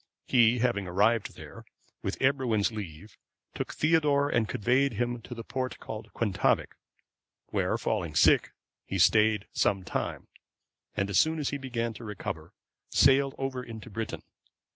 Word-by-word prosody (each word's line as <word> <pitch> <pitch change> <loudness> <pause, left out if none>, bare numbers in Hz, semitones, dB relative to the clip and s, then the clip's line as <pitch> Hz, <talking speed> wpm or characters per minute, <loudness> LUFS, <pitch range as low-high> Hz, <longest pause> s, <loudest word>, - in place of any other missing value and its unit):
He, 120 -1 +4
having 115 -6 0
arrived 105 +5 +1
there, - - -11 0.4
with - - -3
Ebroin's 130 -6 +2
leave 100 -2 -8 0.3
took - - -4
Theodore 150 -3 +2
and 115 -5 +1
conveyed 130 +5 +2
him 120 +2 -2
to 120 - -9
the 115 - -7
port 130 +2 -3
called 110 - -8
Quentavic;(534) 105 -5 +1 0.8
where, - - 0
falling - - -2
sick, - - +5 0.4
he 95 - -2
stayed 105 +2 +4
some 100 -6 +1
time, - - -4 0.7
and 100 - 0
as - - +4
soon 160 +1 +3
as 150 -3 -1
he 140 - -3
began 115 -3 -3
to 115 - -11
recover, 105 -3 -6 0.4
sailed 135 0 +4
over 135 -1 -3
into 115 0 -9
Britain. 110 +2 -5
115 Hz, 145 wpm, -29 LUFS, 105-130 Hz, 0.8 s, sick